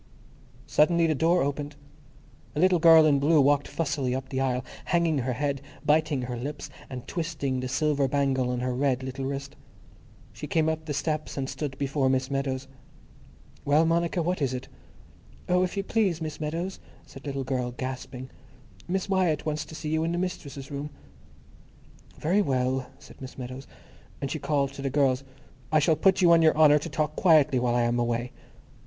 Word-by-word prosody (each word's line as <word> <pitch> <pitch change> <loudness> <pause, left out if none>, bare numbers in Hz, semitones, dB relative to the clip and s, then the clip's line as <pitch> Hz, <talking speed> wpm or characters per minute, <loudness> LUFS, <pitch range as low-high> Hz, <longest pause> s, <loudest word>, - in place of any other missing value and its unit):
Suddenly 170 +2 +3
the 160 - +2
door 165 +4 +2
opened. 145 +1 -3 0.8
A - - -1
little 180 0 +4
girl 160 -1 +8
in 145 -2 +4
blue 150 +3 +4
walked 145 0 +3
fussily 140 -5 -1
up 130 0 -5
the 130 0 -2
aisle, 130 -1 -1 0.2
hanging 170 -4 +1
her 125 0 -1
head, 140 +1 -2 0.2
biting 150 -3 +2
her 125 0 -4
lips, 145 +5 -6 0.2
and 125 -2 -7
twisting 150 -6 -2
the 130 - -3
silver 145 0 +1
bangle 135 -2 +1
on 125 0 -2
her 125 0 -1
red 130 0 0
little 130 +1 -5
wrist. 140 +1 -5 0.8
She - - -7
came 160 -1 +1
up 160 0 -2
the 145 -2 -3
steps 155 +1 -2
and 135 -1 -2
stood 140 -1 -5
before 135 -1 0
Miss 130 +1 0
Meadows. 135 -1 -2 1.0
"Well, 150 +3 +4
Monica, 170 +1 +1
what 180 0 -1
is 130 -2 0
it?" 125 - -6 0.8
"Oh, 180 0 +3
if 185 +2 -1
you 195 - 0
please, 195 -6 +1
Miss 155 -1 -5
Meadows," 170 +5 -3 0.3
said 135 - -12
the 145 - -10
little 135 -1 -3
girl, 130 -2 -2
gasping, 130 +1 -6 0.6
"Miss 190 +2 -1
Wyatt 185 -7 +1
wants 155 0 -2
to 160 - -11
see 155 - -5
you 160 +1 +1
in 165 +1 -1
the - - -1
mistress's 145 -7 -5
room." 145 +1 -4 1.3
"Very 185 +7 +2
well," 130 -4 0
said - - -16
Miss 130 0 -9
Meadows. 130 +1 -7 0.5
And 140 -1 -3
she 155 - -3
called 140 -2 0
to 140 - -8
the 135 - -1
girls, 135 -1 +2 0.5
"I 155 - +4
shall 155 +1 +3
put 190 +4 +3
you 170 - +6
on 165 -1 +6
your 160 -1 +4
honour 150 -1 +6
to - - -6
talk 155 -1 -1
quietly 155 -7 +4
while 120 -1 +1
I 120 - +3
am 120 +1 +1
away." 120 +1 -1
145 Hz, 190 wpm, -27 LUFS, 130-160 Hz, 1.3 s, girl